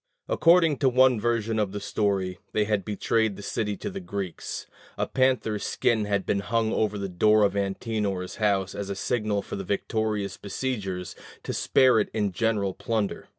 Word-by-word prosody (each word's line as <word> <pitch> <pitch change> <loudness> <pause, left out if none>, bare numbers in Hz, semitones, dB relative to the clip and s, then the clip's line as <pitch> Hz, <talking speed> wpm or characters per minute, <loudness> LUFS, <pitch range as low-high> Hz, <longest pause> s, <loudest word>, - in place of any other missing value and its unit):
According 165 -3 +4
to 135 - +3
one 130 -1 +4
version 115 -1 0
of 100 -2 -1
the 105 - -3
story 100 -2 -1
they 105 - +2
had 105 -2 0
betrayed 105 +1 0
the 100 - -10
city 105 -2 -2
to - - -4
the 195 - -5
Greeks: 100 - -5 0.3
a - - 0
panther's 130 -5 +1
skin 110 -3 +1
had 100 -2 0
been 100 - +1
hung 110 +2 0
over 105 -1 0
the 100 -1 -3
door 105 +4 +4
of 100 -1 +2
Antenor's 100 -1 -2
house 100 -3 +1
as 100 -1 -5
a 100 - -2
signal 105 -1 -1
for - - -6
the 95 - -4
victorious 105 0 -2
besiegers 100 -5 -4 0.3
to - - -4
spare 130 -4 +4
it 105 - 0
in 105 -3 +1
general 105 -2 0
plunder. 110 -1 -2
105 Hz, 180 wpm, -26 LUFS, 100-115 Hz, 0.3 s, According